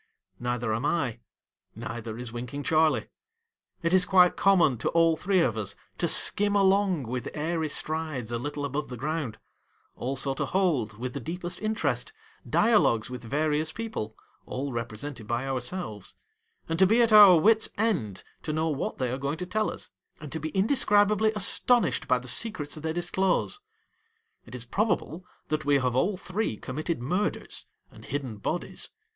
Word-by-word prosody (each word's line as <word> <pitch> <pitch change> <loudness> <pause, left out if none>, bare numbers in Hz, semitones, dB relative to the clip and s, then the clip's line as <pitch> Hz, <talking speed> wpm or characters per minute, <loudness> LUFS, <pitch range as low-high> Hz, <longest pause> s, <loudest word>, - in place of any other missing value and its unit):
Neither 120 -2 -1
am 115 +4 -2
I. 145 -6 0 0.6
Neither 110 0 -6
is 120 -2 -6
Winking 125 +4 -5
Charley. 155 -7 +2 0.8
It 170 +1 +1
is 185 -1 +6
quite 180 -1 +5
common 175 - +3
to - - 0
all 165 -1 +3
three 185 +2 +1
of 120 -8 +1
us 100 -1 -4 0.2
to 170 - +2
skim 205 +4 +4
along 195 -5 +3
with 125 +1 -4
airy 160 +1 -1
strides 155 -6 -2
a 120 - -2
little 145 +2 -4
above 140 +1 -3
the 125 - -6
ground; 145 -4 -3 0.6
also 135 +1 -1
to - - -2
hold, 150 - 0
with 125 +2 -5
the - - -4
deepest 175 +6 -6
interest, 220 - -1 0.4
dialogues 200 - +3
with 125 - -6
various 150 +5 0
people, 160 - -5 0.3
all 135 +1 -4
represented 115 +1 -6
by 120 +3 -1
ourselves; 125 - -4 0.5
and 165 +1 -2
to 190 - +6
be 225 +5 +3
at 230 -2 +2
our 205 -4 +10
wit's 220 +6 +3
end 180 - -1 0.2
to 155 - -4
know 160 +1 0
what 145 -3 -3
they 125 -2 -1
are 130 - -3
going 140 +3 -2
to 180 - -4
tell 215 +4 0
us; - - -8 0.3
and 150 -3 -9
to 160 - -3
be 155 +1 -4
indescribably 210 - +3
astonished 210 - +3
by 125 - +3
the 125 +1 -8
secrets 150 - -1
they 160 +1 -3
disclose. 180 - 0 0.9
It - - -9
is 120 -1 -6
probable 185 - -1 0.2
that 155 0 -1
we 145 0 +3
have 125 -2 0
all 185 +9 +1
three 180 - -3
committed 155 - -4
murders 180 +10 -2 0.2
and - - -15
hidden 130 -6 -4
bodies. 160 +12 -4
155 Hz, 165 wpm, -27 LUFS, 125-185 Hz, 0.9 s, our